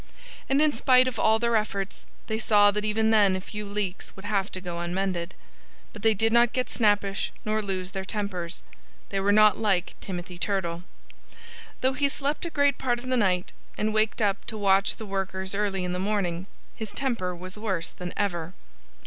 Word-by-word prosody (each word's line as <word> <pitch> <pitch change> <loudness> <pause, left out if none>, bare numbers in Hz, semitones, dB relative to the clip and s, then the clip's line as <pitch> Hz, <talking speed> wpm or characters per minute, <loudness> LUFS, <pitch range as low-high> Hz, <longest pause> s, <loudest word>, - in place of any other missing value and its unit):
And 275 +3 +4
in 305 -1 +3
spite 255 +1 +5
of 250 -4 -3
all 220 0 +4
their 235 0 +1
efforts 200 -2 -2 0.2
they 220 0 -2
saw 205 -2 +5
that 210 +1 -2
even 220 +1 +2
then 205 -3 +5
a - - -2
few 210 +3 -6
leaks 200 -2 -3
would 195 - -11
have 200 -2 0
to 185 - -2
go 175 -2 -5
unmended. 180 0 -2 0.6
But 210 - -9
they 220 0 +4
did 225 +3 +1
not 235 0 +5
get 255 -1 -1
snappish 205 -3 +1
nor 215 0 +1
lose 190 -2 -3
their 190 -1 -4
tempers. 190 -4 -3 0.5
They 195 - -1
were 200 +1 +2
not 215 -1 +6
like 195 -5 +1
Timothy 180 -2 -6
Turtle. 175 -5 -1 1.0
Though 260 +1 +2
he 280 +1 +2
slept 285 +4 -2
a - - -4
great 285 -3 +2
part 245 -2 +1
of 250 +2 -7
the 255 - +2
night, 185 -6 +1 0.3
and 215 0 0
waked 215 +1 +1
up 200 -1 +1
to 220 - -4
watch 195 -1 +3
the 220 - -8
workers 190 -1 -3
early 200 -2 0
in 180 - -2
the 180 - -2
morning, 190 -3 -1 0.3
his 220 -2 -6
temper 230 -10 -1
was 185 +2 -8
worse 195 -6 -2
than 180 -1 -6
ever. 175 -4 -2
205 Hz, 195 wpm, -26 LUFS, 190-220 Hz, 1.0 s, not